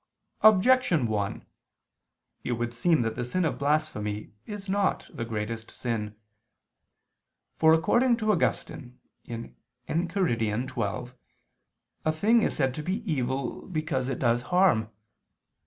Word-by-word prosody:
Objection 215 - +5
1: 105 -3 -2 1.0
It 120 - -1
would 120 0 -2
seem 155 +2 +2
that 115 -1 -2
the 125 - -2
sin 170 +9 0
of 160 - -2
blasphemy 140 -9 -1
is 205 -1 -7
not 200 0 0
the 115 - -4
greatest 115 0 -4
sin. 110 -4 -3 1.4
For, 160 0 +6
according 240 +9 +3
to 215 -2 +1
Augustine 125 -8 -1 0.3
(Enchiridion 125 - -2 0.4
xii), 125 - -18 0.9
a 155 - +2
thing 215 +9 +3
is - - 0
said 135 -3 +1
to 150 - -5
be 195 +8 -3
evil 130 -2 -2
because 155 -7 -2
it - - -2
does 120 -1 +2
harm. 180 - +3
135 Hz, 125 wpm, -27 LUFS, 115-185 Hz, 1.4 s, For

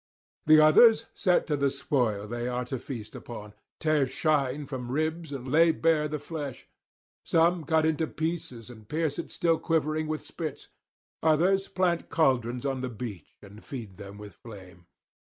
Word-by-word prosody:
The 155 0 +8
others 220 +10 +7
set 180 -4 +2
to 150 - 0
the 140 -1 +2
spoil 125 -7 -1
they 120 +2 -4
are 125 0 -2
to 130 +1 -4
feast 115 -4 -7
upon, 105 -3 -9 0.3
tear 155 -3 +2
chine 145 -1 0
from 130 -3 -6
ribs 155 +2 -2
and 135 -2 -6
lay 165 +2 +6
bare 160 -1 +2
the 150 0 -3
flesh; 145 -3 -7 0.6
some 170 +1 +2
cut 160 0 +2
it - - +4
into 160 0 -1
pieces 155 -9 -4
and 110 -3 -15
pierce 155 -2 -1
it - - -5
still 165 -1 +1
quivering 155 -1 0
with 155 0 -3
spits; 155 -4 -6 0.5
others 175 +5 +3
plant 175 -2 0
cauldrons 125 -5 +1
on 135 -2 -1
the 130 - -3
beach 110 -7 -8
and 105 +2 -13
feed 110 -9 -8
them 100 0 -10
with 105 -2 -10
flame. 90 -5 -13
145 Hz, 170 wpm, -28 LUFS, 120-160 Hz, 0.6 s, The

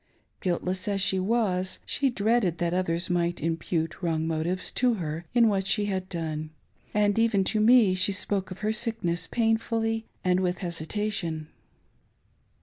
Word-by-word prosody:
Guiltless 185 +1 -2
as 200 -1 0
she 190 0 +2
was, 190 -3 0
she 275 -1 +2
dreaded 215 -6 +1
that 170 0 0
others 175 -1 0
might 175 -1 0
impute 165 +1 -2
wrong 160 -3 0
motives 165 +3 -1
to 245 -2 +2
her 165 -3 -4
in 235 -1 +6
what 195 -2 +1
she 210 0 +1
had 190 -2 -2
done; 155 -3 -3 0.4
and 205 0 +2
even 225 -4 +3
to 215 +3 0
me 220 -3 +6
she 185 +2 +2
spoke 195 -1 -2
of 185 +1 -9
her 215 +1 +1
sickness 215 -7 -2
pain 225 -1 +2
fully 225 0 -2 0.2
and 180 0 +3
with 180 -1 0
hesitation. 170 -2 -3
185 Hz, 155 wpm, -27 LUFS, 170-215 Hz, 0.4 s, in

